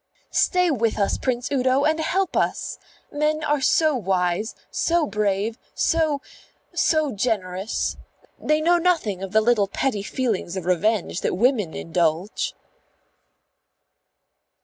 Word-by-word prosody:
"Stay 360 -2 +3
with 230 -5 0
us, 200 -2 0
Prince 250 0 -2
Udo, 260 0 +2
and 315 +2 +2
help 365 +4 0
us! - - -1 0.3
Men 305 +1 0
are 295 -2 +1
so 310 +2 +3
wise, 190 -1 -1 0.2
so 340 -1 +1
brave, 210 +1 -1 0.2
so 315 -4 +1 0.5
so 310 -4 +2
generous. 200 -3 -2 0.4
They 305 0 +1
know 345 +2 +4
nothing 320 - +1
of 195 -1 -5
the 220 +1 +4
little 215 -3 +3
petty 210 +1 -1
feelings 205 -5 -2
of 185 - -5
revenge 185 +1 0
that - - 0
women 220 -6 +1
indulge." 165 +3 -1
235 Hz, 125 wpm, -23 LUFS, 195-305 Hz, 0.5 s, know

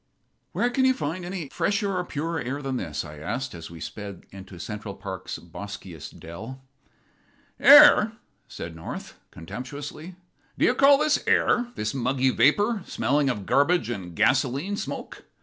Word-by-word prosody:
"Where 245 - 0
can 260 +2 +1
you 260 0 +4
find 165 +2 -4
air 175 - -6
any 175 -7 -5
fresher 200 +3 0
or 180 - 0
purer 150 -4 -3
than 135 -1 -2
this?" 75 -9 -4
I 75 -1 -10
asked, 125 - -4
as 85 -2 -9
we 85 -1 -11
sped 100 -1 -8
into 95 -1 -11
Central's 105 +2 -6 0.4
boskiest 90 -2 -9
dell. 110 +11 -8 1.0
"Air!" 285 -7 +8 0.3
said 85 -1 -8
North, 80 - -8
contemptuously. 145 - -8 0.4
"Do - - +3
you - - +4
call 275 +2 +6
this 305 +1 +1
air? 245 0 +3
this 110 0 -2
muggy 130 0 +1
vapor, 205 - +3
smelling 140 0 +1
of 105 -6 -3
garbage 145 - +2
and 90 -7 -6
gasoline 135 - +1
smoke. - - -6
135 Hz, 150 wpm, -25 LUFS, -, 1.0 s, Air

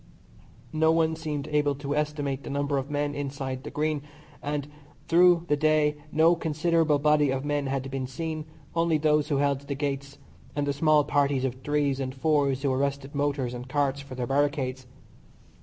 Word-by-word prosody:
No 160 +1 +4
one 160 -1 +2
seemed 150 -3 -4
able 145 -1 +2
to 140 +1 -3
estimate 145 -2 -1
the - - -8
number 140 0 0
of 135 +2 -6
men 145 0 -1
inside 135 -2 -4
the 150 - -6
Green, 150 -1 -1 0.4
and 145 -1 -3 0.4
through 175 0 +5
the 150 - +3
day 155 0 +2 0.2
no 160 +3 +5
considerable 160 -1 +1
body 150 0 +3
of 135 +1 -1
men 145 -1 0
had 135 0 -2
been 130 -1 -3
seen, 155 +3 -4 0.3
only 165 -1 +2
those 150 -1 +2
who 145 - 0
held 140 -1 +1
the 140 0 -5
gates, 140 0 -3 0.4
and 145 -1 0
the 140 - 0
small 150 +1 +4
parties 140 -2 +1
of 130 - -1
threes 145 -2 +1
and 130 -1 -3
fours 140 -2 +1
who 135 -2 +2
arrested 140 +1 -2
motors 140 -3 -1
and 125 +1 -7
carts 140 -1 0
for 135 -2 -9
their 125 -1 -2
barricades. 135 -2 0
145 Hz, 180 wpm, -27 LUFS, 135-150 Hz, 0.4 s, through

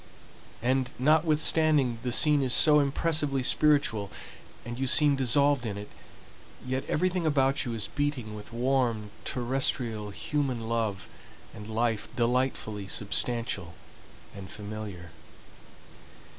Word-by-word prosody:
And 130 +1 +1
notwithstanding 155 -3 +3
the 125 - -3
scene 150 +3 +4
is 130 -2 +2
so 150 -1 +6
impressively 145 -1 +1
spiritual, 130 -9 +2 0.6
and 120 +1 -6
you 135 - -1
seem 145 +1 +4
dissolved 135 +1 +2
in 105 -4 -4
it, 105 0 -8 0.8
yet 130 +1 -2
everything 180 0 0
about 135 -3 +2
you 120 -2 -3
is 105 -2 -1
beating 145 -5 -3
with 105 +2 -10
warm, 120 -4 0
terrestrial, 120 -4 -1
human 130 +1 -3
love 110 -4 -2 0.5
and 105 0 -10
life 115 -1 -1
delightfully 120 -4 -1
substantial 100 -3 -1 0.6
and 95 -1 -9
familiar. 105 -5 -8
125 Hz, 115 wpm, -28 LUFS, 110-145 Hz, 0.8 s, so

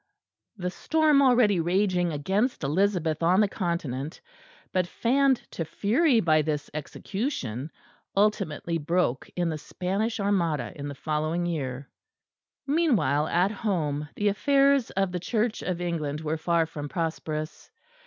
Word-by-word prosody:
The 180 -2 -3
storm 310 - +3
already 245 -8 +4
raging 180 0 +1
against 190 - 0
Elizabeth 165 0 +1
on 175 +3 +4
the 210 - +5
Continent, 160 - -3 0.5
but 185 -1 +1
fanned 265 +6 +2
to 165 - -3
fury 230 - +2
by 155 -6 +3
this 150 -1 -3
execution, 155 - -4 0.5
ultimately 180 -5 +1
broke 160 -4 0
in 175 -1 0
the 155 -1 -3
Spanish 200 +8 -2
Armada 170 - 0
in 145 0 -6
the 140 - -6
following 155 +4 -1
year. 140 -5 -3 0.8
Meanwhile, 225 - +2
at 180 +5 +2
home, 155 -9 -2
the 205 0 +2
affairs 275 +4 +3
of 195 -1 0
the 180 - -2
Church 215 +5 -1
of 180 -1 -2
England 155 -4 -2
were 160 0 -1
far 165 0 +1
from 145 -2 -7
prosperous. 160 -2 -4
175 Hz, 135 wpm, -27 LUFS, 155-210 Hz, 0.8 s, the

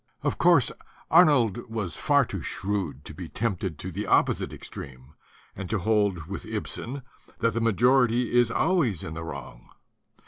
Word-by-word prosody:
Of - - -1
course, - - +5 0.4
Arnold 130 - +4
was 110 -6 -3
far 145 -3 +3
too 95 -5 -5
shrewd 95 -8 -3
to - - -9
be 85 +1 -8
tempted 95 -7 -2
to 95 - -6
the 100 +5 -4
opposite - - +2
extreme 65 +2 -10 0.4
and 95 -2 -6
to 105 - 0
hold 100 -4 +1
with 95 +4 -6
Ibsen 115 +4 -5 0.3
that 115 0 +1
the 115 - -1
majority 120 +1 +3
is 120 -1 +5
always 155 - +1
in 80 - -6
the 85 +1 -6
wrong. 70 -6 -9
105 Hz, 160 wpm, -26 LUFS, 90-120 Hz, 0.4 s, course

